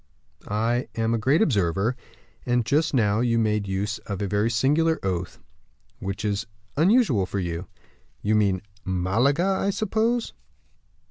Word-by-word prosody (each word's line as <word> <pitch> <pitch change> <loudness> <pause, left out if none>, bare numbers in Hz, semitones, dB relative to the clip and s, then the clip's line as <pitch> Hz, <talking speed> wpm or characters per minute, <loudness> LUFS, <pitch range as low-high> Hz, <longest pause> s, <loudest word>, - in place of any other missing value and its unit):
"I 115 +4 0
am 115 0 0
a 115 - +1
great 135 - +3
observer; 100 - +1 0.5
and 120 -2 +1
just 155 +6 +2
now 105 -5 +2
you 120 -1 +2
made 105 -2 +1
use 100 +3 -2
of 100 -2 -3
a 100 - -1
very 105 +3 +1
singular 150 +8 +2
oath, 90 -2 -2 0.6
which 100 +2 -4
is 105 +1 -1 0.3
unusual 165 - +3
for 100 - -4
you." 85 -1 -3 0.6
"You 105 - +1
mean 100 -3 +2 0.2
Malaga! 110 - +1
I 195 0 +1
suppose?" 220 +3 0
110 Hz, 140 wpm, -25 LUFS, 100-140 Hz, 0.6 s, great